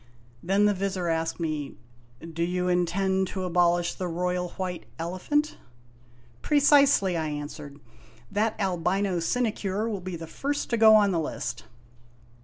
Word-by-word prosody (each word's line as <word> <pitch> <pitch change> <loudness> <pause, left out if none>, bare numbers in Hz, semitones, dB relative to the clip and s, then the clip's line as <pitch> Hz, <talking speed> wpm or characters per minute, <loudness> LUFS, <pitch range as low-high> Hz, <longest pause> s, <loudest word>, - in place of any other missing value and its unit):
Then 195 +4 +2
the 210 - +4
Vizir 190 -2 -2
asked 165 +1 -1
me: 155 -4 -3 0.6
"Do 165 - -4
you 180 +1 -1
intend 190 +2 +1
to 190 0 -4
abolish 175 -1 +2
the 185 - -4
Royal 180 +1 -2
White 185 -2 -4
Elephant? 185 - -1 0.3
" 120 0 -29
" 120 -1 -29
Precisely," 280 - +4
I 160 -2 -1
answered. 145 -1 -7 0.5
"That 215 +2 0
albino 190 0 0
sinecure 215 +1 -1
will 205 -4 -3
be 185 0 -5
the 165 0 -7
first 285 - -3
to 235 - +2
go 220 -1 +7
on 205 -2 +4
the 170 - 0
list." 155 - -4
180 Hz, 150 wpm, -26 LUFS, 165-205 Hz, 0.6 s, go